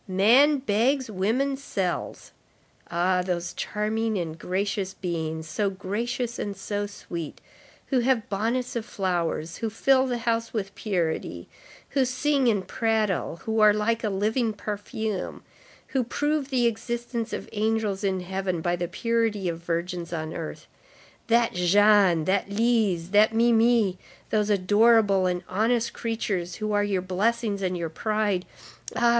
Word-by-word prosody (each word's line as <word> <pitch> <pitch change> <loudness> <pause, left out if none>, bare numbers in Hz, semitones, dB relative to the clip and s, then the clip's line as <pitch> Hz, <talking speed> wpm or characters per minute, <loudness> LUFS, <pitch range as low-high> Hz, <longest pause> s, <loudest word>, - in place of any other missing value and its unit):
Man 235 +11 +5
begs, 255 +1 +1
woman 230 +9 0
sells. 195 -10 -3 0.6
Ah! 180 +2 +2
those 175 -1 -3
charming 215 +1 -1
and 165 -3 -3
gracious 190 +2 -2
beings, 160 -3 -3
so 205 +4 0
gracious 230 +5 -3
and 200 -2 -4
so 205 +1 -3
sweet, 170 -6 -7 0.5
who 265 - +1
have 240 -2 +1
bonnets 235 +6 -1
of 235 - -1
flowers, 175 -6 -2
who 225 - -2
fill 260 +4 +3
the 245 -1 -1
house 230 0 -1
with 200 -3 -3
purity, 175 -8 -2 0.4
who 275 - +2
sing 260 +1 +1
and 200 -5 +1
prattle, 215 -7 0
who 220 0 0
are 210 -1 +7
like 225 +2 0
a 215 - +1
living 215 +4 0
perfume, 210 0 -4 0.5
who 265 -2 +1
prove 290 +3 -1
the 250 -3 +2
existence 235 0 -2
of - - -5
angels 215 -2 0
in 190 -2 0
heaven 190 -1 -2
by 175 +2 0
the 175 0 -3
purity 225 0 0
of 165 -1 -2
virgins 170 0 -3
on 160 -2 -4
earth, 160 -2 -6 0.6
that 235 0 +3
Jeanne, 185 -2 +4
that 195 +1 +1
Lise, 205 -5 +1
that 215 +2 +5
Mimi, 230 -4 +3 0.3
those 210 -1 +1
adorable 205 0 +4
and 180 0 -1
honest 225 +4 +1
creatures 195 -7 -2
who 215 -1 -3
are 205 0 +2
your 195 -3 0
blessings 205 +2 0
and 185 -1 -1
your 170 -1 -3
pride, 210 +1 -1 0.5
ah! 240 - +3
210 Hz, 145 wpm, -26 LUFS, 185-230 Hz, 0.6 s, are